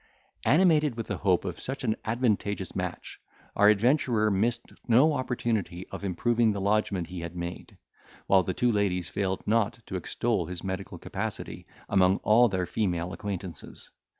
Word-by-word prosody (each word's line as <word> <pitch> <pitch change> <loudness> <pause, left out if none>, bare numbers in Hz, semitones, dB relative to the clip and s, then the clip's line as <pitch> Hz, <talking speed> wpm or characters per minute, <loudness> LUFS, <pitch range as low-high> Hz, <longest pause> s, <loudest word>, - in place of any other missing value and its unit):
Animated 155 -4 +4
with 115 - -3
the - - -3
hope 95 -4 +1
of - - -4
such 135 +1 -4
an 110 -3 +1
advantageous 105 -5 -1
match, - - -5 0.4
our 105 +1 +6
adventurer 110 0 +3
missed 115 +5 -1
no 130 +7 +5
opportunity 115 -9 -2
of - - -7
improving 115 +4 +1
the 100 - -3
lodgment 100 -2 +1
he 90 -1 -6
had 85 +1 -6
made, 85 0 -6 0.5
while 95 -1 +5
the 95 0 -3
two 120 -1 +2
ladies 95 -5 0
failed 95 -2 -2
not 115 +2 +1
to 95 - -6
extol 95 0 -1
his 90 0 -6
medical 95 0 -5
capacity - - -5 0.2
among 95 0 +3
all 115 +3 +5
their 95 -2 -1
female 90 -3 -2
acquaintances. 95 -4 -7
105 Hz, 155 wpm, -28 LUFS, 95-120 Hz, 0.5 s, our